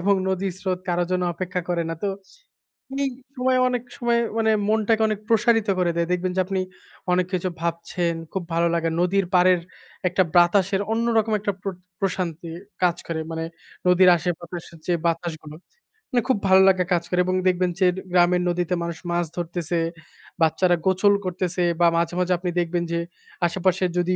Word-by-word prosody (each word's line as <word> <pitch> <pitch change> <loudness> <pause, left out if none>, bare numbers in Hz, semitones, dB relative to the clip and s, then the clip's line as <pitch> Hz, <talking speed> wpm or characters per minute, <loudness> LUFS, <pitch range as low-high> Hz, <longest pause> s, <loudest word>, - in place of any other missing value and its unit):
এবং 200 +3 +3
নদীর 190 0 -1
স্রোত 185 -1 -2
কারো 175 0 +1
জন্য 180 0 +1
অপেক্ষা 180 +1 -3
করে 175 -1 0
না। 165 - -2
তো 205 - +1 1.0
এই 275 - +1 0.3
সময়, 255 0 +2
অনেক 250 -1 -1
সময় 235 -1 +1 0.2
মানে 220 -1 +3 0.2
মনটাকে 220 +1 +2
অনেক 215 -2 -2
প্রসারিত 225 -1 +3
করে 175 -1 +2
দেয়। 170 - +1
দেখবেন 180 +1 0
যে, - - +1
আপনি 190 0 -2 0.5
অনেক 180 0 +2
কিছু 185 0 0
ভাবছেন। 170 0 -2 0.2
খুব 190 -2 -3
ভালো 170 +1 +2
লাগে 165 0 0
নদীর 185 +2 +2
পাড়ের 180 0 +5 0.5
একটা 185 +1 +2
বাতাসের 190 +2 +4
অন্য 230 +1 +1
রকম 220 0 +2
একটা 205 0 -1
প্র 200 - -2 0.3
প্রশান্তি 175 -4 -2 0.3
কাজ 175 -2 +3
করে, 165 -1 -2
মানে 160 0 -3 0.4
নদীর 180 0 +6
আশেপাশের 170 0 -5
যে 175 - +2
বাতাসগুলো 160 -2 -3 0.5
মানে 245 -2 +2
খুব 260 - +4
ভালো 190 0 +7
লাগে 185 -1 +4
কাজ 170 -1 +1
করে, 180 - 0
এবং 185 0 0
দেখবেন 180 0 +2
যে 190 - +4 0.3
গ্রামের 180 0 +4
নদীতে 175 0 0
মানুষ 170 -1 -4
মাছ 175 0 +1
ধরতেছে, 175 -1 -2 0.6
বাচ্চারা 175 +3 +3
গোসল 190 +2 +4
করতেছে, 180 0 -1 0.2
বা 170 - +7
মাঝে, 170 +1 0
মাঝে 180 0 +2
আপনি 180 +1 -3
দেখবেন 175 0 0
যে, 170 - 0 0.5
আশেপাশের 185 +1 0
যদি 180 +1 +1
180 Hz, 170 wpm, -23 LUFS, 175-195 Hz, 1.0 s, ভালো